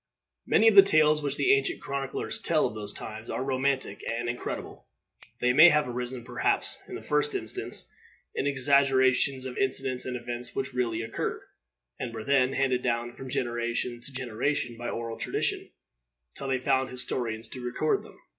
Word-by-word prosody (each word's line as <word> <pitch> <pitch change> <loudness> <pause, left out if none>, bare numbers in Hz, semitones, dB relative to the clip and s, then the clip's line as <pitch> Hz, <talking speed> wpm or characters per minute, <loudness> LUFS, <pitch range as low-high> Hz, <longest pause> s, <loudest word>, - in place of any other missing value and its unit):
Many 225 - +5
of 225 - +7
the 200 - +11
tales 155 -5 +4
which 140 -1 -1
the 385 - +4
ancient 400 -5 +1
chroniclers 140 -1 -3
tell - - +2
of - - -2
those 105 -1 -4
times 110 +2 -7
are - - -2
romantic 135 -4 -1
and 120 +1 -3
incredible; 120 +1 -5 0.6
they 125 0 +3
may 155 +6 +9
have 150 -2 +2
arisen, 125 0 -4
perhaps, - - +1
in - - -7
the - - -8
first 150 0 +1
instance, 110 - -1 0.5
in 140 - -1
exaggerations 135 -1 +3
of 130 -1 -5
incidents 130 -1 0
and 125 -1 -3
events 120 0 -6
which 135 0 -2
really 115 -2 -1
occurred, 115 - -4 0.6
and 115 -2 -5
were 110 - -5
then 135 -1 +3
handed 130 -2 +1
down 120 -1 -1
from 130 +1 -9
generation 120 0 -2
to 140 - -9
generation 125 0 -2
by 120 +1 -5
oral 115 -1 -5
tradition, - - -1 0.7
till 135 - -6
they 130 -1 +1
found 130 +1 +1
historians 120 -3 -3
to 130 - -8
record 125 +5 0
them. - - -15
130 Hz, 175 wpm, -28 LUFS, 120-140 Hz, 0.7 s, the